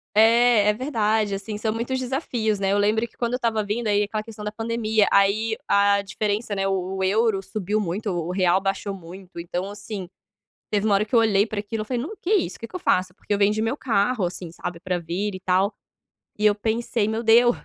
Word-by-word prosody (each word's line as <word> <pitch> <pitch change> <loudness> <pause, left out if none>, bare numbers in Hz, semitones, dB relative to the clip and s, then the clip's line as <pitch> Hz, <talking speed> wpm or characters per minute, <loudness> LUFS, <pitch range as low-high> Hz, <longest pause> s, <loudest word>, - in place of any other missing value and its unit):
É, 225 -1 +5
é - - +4
verdade, 220 -4 0
assim, 205 +2 -4
são 220 0 -1
muitos 240 +3 -2
desafios, 245 -5 -1
né, 195 0 +1
eu 200 - +2
lembro 215 +3 +2
que - - -30
quando 235 -1 -1
eu 250 - +1
estava 225 -3 0
vindo, 215 +3 -2
aí 205 0 +3
aquela 215 +1 -3
questão 215 -1 -9
da 210 - -2
pandemia, 220 -1 +1
aí 215 +3 +3
a 200 0 +3
diferença, 205 +2 -2
né, 195 0 0
o 190 -1 -1
o 190 - -1
euro 210 +1 +2
subiu 210 +1 -2
muito, 200 +2 -2
o 175 0 -2
real 185 0 +2
baixou 195 +1 -2
muito, 180 0 -11
então, 175 +2 -3
assim, 205 -2 -7 0.6
teve 205 -1 0
uma 210 - +3
hora 200 +2 +3
que 220 - -2
eu - - +7
olhei 205 -3 +4
para 215 - -4
aquilo, 215 +2 -4
eu - - -5
falei: 245 0 -2
"Não. 395 +10 -6
Que 360 - -2
isso? 375 - -1
Que 230 - -6
que - - -14
eu 365 - -3
faço?" 185 - +1
Porque 205 - -4
eu - - +2
vendi 210 +2 +3
meu 225 +4 0
carro, 225 -4 +1
assim, 175 -1 -5
sabe, 170 0 -6
pra 180 -1 -2
vir 180 +5 -3
e 185 - -6
tal, 190 +2 +1 0.7
e 210 - +1
eu 210 -1 +5
pensei: 220 0 -1
"Meu 220 +1 -1
Deus, 235 +2 +5
210 Hz, 230 wpm, -24 LUFS, 195-225 Hz, 0.7 s, eu